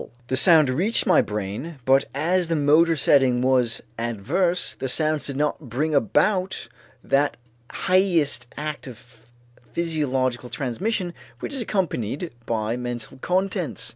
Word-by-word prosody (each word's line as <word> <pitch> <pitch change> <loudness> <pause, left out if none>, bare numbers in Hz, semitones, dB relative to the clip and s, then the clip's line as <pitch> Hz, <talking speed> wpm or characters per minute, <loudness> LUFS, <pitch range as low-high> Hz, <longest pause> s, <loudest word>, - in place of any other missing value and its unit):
The 130 - +1
sound 155 +1 +6
reached 180 - +1
my - - +5
brain 105 +10 -5
but 135 +1 +4
as 175 +4 +1
the 165 - 0
motor 155 +3 +4
setting 130 -3 +3
was 125 -3 +1 0.2
adverse, 145 - -1
the 130 - -4
sounds 155 +2 +1
did 140 -1 -4
not 150 -2 -2
bring 150 +7 -1
about 185 - +1 0.4
that 145 +1 +1 0.3
highest 170 -10 +1
act 150 -1 -5
of 120 -1 -14 0.5
physiological 130 -7 -1
transmission 175 - -2 0.3
which - - -5
is 270 - -1
accompanied 170 - -2 0.2
by 110 +1 -1
mental 120 +1 -6
contents. 185 +6 -1
145 Hz, 130 wpm, -24 LUFS, 125-170 Hz, 0.5 s, sound